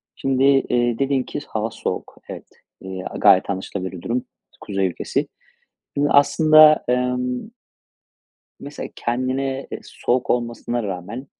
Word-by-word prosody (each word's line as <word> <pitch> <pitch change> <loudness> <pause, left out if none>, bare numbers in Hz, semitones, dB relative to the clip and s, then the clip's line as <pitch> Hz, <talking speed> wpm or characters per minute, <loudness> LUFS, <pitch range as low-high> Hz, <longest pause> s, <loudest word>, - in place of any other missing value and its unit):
Şimdi, 135 -1 0
eee, 125 -4 +2
dedin 135 -1 +1
ki - - -5
hava 110 0 -2
soğuk. - - -5
Evet, - - -8 0.3
eee, 95 -1 -6
a - - -7
gayet 100 -2 +5
anlaşılabilir 95 -1 -4
bir 90 - -9
durum 120 +5 -2 0.4
kuzey 95 -2 -1
ülkesi. 90 - -2 0.7
Şimdi 145 +1 +2
aslında, 155 +1 +6
emm 125 - -1 1.1
mesela 145 +1 -7
kendine, 130 +2 -2
eee, - - -5
soğuk 125 +1 -2
olmasına 120 0 -1
rağmen 100 +6 -6
125 Hz, 125 wpm, -21 LUFS, 105-135 Hz, 1.1 s, aslında